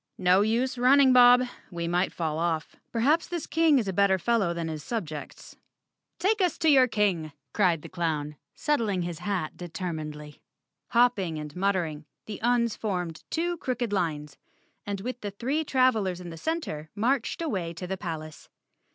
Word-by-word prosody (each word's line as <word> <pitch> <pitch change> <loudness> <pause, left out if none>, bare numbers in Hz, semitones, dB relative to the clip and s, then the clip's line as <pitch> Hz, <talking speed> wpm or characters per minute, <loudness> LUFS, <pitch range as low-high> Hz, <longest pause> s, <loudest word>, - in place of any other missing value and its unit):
"No 185 +1 +4
use 240 +4 0
running, 260 +1 +6
Bob. 250 0 +7 0.3
We 170 -2 -4
might 175 +2 +1
fall 160 -2 -2
off. 165 -2 -1 0.2
Perhaps 285 +8 +2
thid 345 -4 -4
King 320 -1 +4
is 225 -5 0
a 190 - -1
better 195 0 +3
fellow 200 -1 +1
than 170 -1 -3
his 155 -2 -5
subjects. 155 -11 -6 0.6
"Take 420 +2 +1
us 360 -2 +1
to 320 - +2
your 260 -3 +6
King!" 190 -9 0 0.2
cried 175 -6 +2
the - - -7
clown, 155 -4 -2 0.2
settling 220 - 0
his 170 -2 -5
chp 180 -4 -2
determinedly. 155 -4 -6 0.5
Hopping 230 -9 +2
and 150 -1 -7
muttering, 180 -6 -1 0.2
the 210 -2 -7
Uns 235 -1 +2
formed 180 -6 -3
two 345 +2 -1
crooked 245 -6 -2
lines, 150 -6 -2 0.5
and 200 -1 -3
with 250 +3 -5
the 205 - -3
three 260 +10 -2
trav¬ 255 -3 +3
elers 190 -5 -2
in 175 -1 -8
the - - -7
center 165 - -3
marched 235 +3 0
away 190 - -2
to 180 - -6
the 190 +2 -3
palace. 160 -5 -7
195 Hz, 170 wpm, -27 LUFS, 165-245 Hz, 0.6 s, Bob